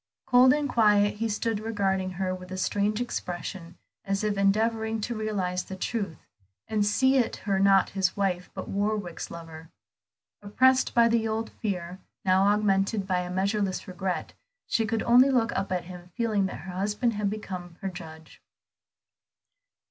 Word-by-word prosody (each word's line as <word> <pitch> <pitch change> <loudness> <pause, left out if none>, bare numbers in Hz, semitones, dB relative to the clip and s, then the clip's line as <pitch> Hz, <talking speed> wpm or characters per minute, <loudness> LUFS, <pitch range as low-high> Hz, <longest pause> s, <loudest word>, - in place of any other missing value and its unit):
Cold 255 0 +6
and 295 +1 +1
quiet, 210 -4 +3
he 225 +1 -1
stood 220 +1 -1
regarding 195 -4 -1
her 185 0 -2
with 185 0 -8
a 185 - -4
strange 205 +3 0
expression, 175 -6 -5 0.3
as 195 +1 -1
if 210 -1 0
endeavoring 220 +3 +1
to 235 +3 -3
realize 200 -5 -2
the 190 - -7
truth, 195 -3 -3 0.5
and 215 -2 +1
see 260 +4 +4
in - - -6
her 195 -2 +1
not 195 0 +4
his 190 -2 0
wife 185 -3 -1
but - - -6
Warwick's 200 -3 -2
lover. 165 -1 -10 0.7
Oppressed 255 +6 +3
by 235 -1 +6
the 230 -1 +1
old 220 +1 -2
fear, 180 -4 -4 0.3
now 190 +1 +4
augmented 205 0 +2
by 185 -1 0
a 180 0 -4
measureless 195 +1 -1
regret, 180 -3 -3 0.3
she 225 -2 0
could 225 0 -1
only 250 +3 +6
look 235 -3 +2
up 195 - -2
at 180 -1 -1
him 180 0 -11
feeling 215 -5 +1
that - - -7
her 190 - -7
husband 210 +6 0
had 205 -1 -1
become 185 -5 -6
her 195 - -2
judge. 160 -3 -11
200 Hz, 165 wpm, -27 LUFS, 185-220 Hz, 0.7 s, Cold